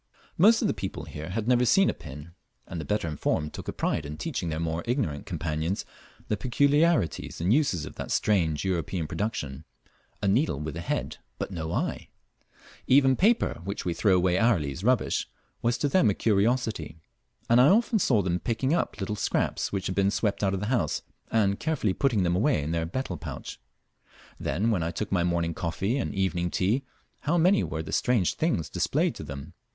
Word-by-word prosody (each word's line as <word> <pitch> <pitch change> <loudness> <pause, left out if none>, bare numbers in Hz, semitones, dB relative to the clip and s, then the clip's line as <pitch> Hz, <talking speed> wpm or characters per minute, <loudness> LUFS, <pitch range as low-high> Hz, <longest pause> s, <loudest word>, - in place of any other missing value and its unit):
Most 220 +7 +5
of - - +3
the - - +1
people 95 -5 -5
here 75 +2 -7
had 110 +4 -3
never 125 0 +4
seen 195 +10 +5
a - - +1
pin, 75 +3 -10 0.3
and 85 - -5
the - - -7
better 105 +2 -1
informed 75 0 -1
took - - -8
a - - -1
pride - - -1
in 75 +1 -7
teaching 125 - -3
their 80 0 -2
more 80 0 -2
ignorant 115 - -1
companions 85 0 -2 0.4
the 105 - +1
peculiarities 145 - +1
and 90 +6 +2
uses 120 - +1
of - - -10
that - - -5
strange 85 -6 +1
European 90 -2 -1
production 75 -6 -3 0.6
a 100 - -1
needle 100 - +2
with 75 0 -5
a 85 - -4
head, 85 - -3 0.2
but - - -4
no 80 -3 -4
eye! - - -2 0.8
Even 135 0 +5
paper, 215 - +2
which 100 +1 -4
we 90 - 0
throw 95 +1 +3
away 90 0 +2
hourly 95 -12 +2
as 90 - -7
rubbish, 125 +1 +1 0.3
was 120 0 +1
to 145 - 0
them 140 -5 +4
a 100 - +1
curiosity; 110 -6 0 0.5
and 120 +1 +6
I 130 - +7
often 220 +3 +4
saw 115 - +3
them 90 -1 0
picking 130 - 0
up 170 - -1
little 105 +1 -2
scraps - - -1
which 95 -1 -2
had 95 - -1
been 100 +1 +2
swept 105 0 -1
out 95 -1 +2
of 95 - -4
the - - -2
house, 80 -12 0 0.3
and 100 -3 +2
carefully 155 -11 0
putting 115 -7 +1
them 85 0 +1
away 105 - +2
in 75 - -3
their 85 -1 -1
betel 90 -2 -3
pouch. - - -7 0.8
Then 110 +5 0
when 95 -6 +1
I 80 - -1
took 95 +5 -4
my 90 -3 +2
morning 85 -1 0
coffee 95 - -1
and - - -3
evening 90 -2 0
tea, 110 +11 0 0.3
how 165 +4 0
many 185 +4 +4
were 80 0 -3
the - - -7
strange 115 -8 +2
things 155 - 0
displayed - - 0
to - - -8
them! 70 +5 -8
95 Hz, 200 wpm, -27 LUFS, 85-125 Hz, 0.8 s, I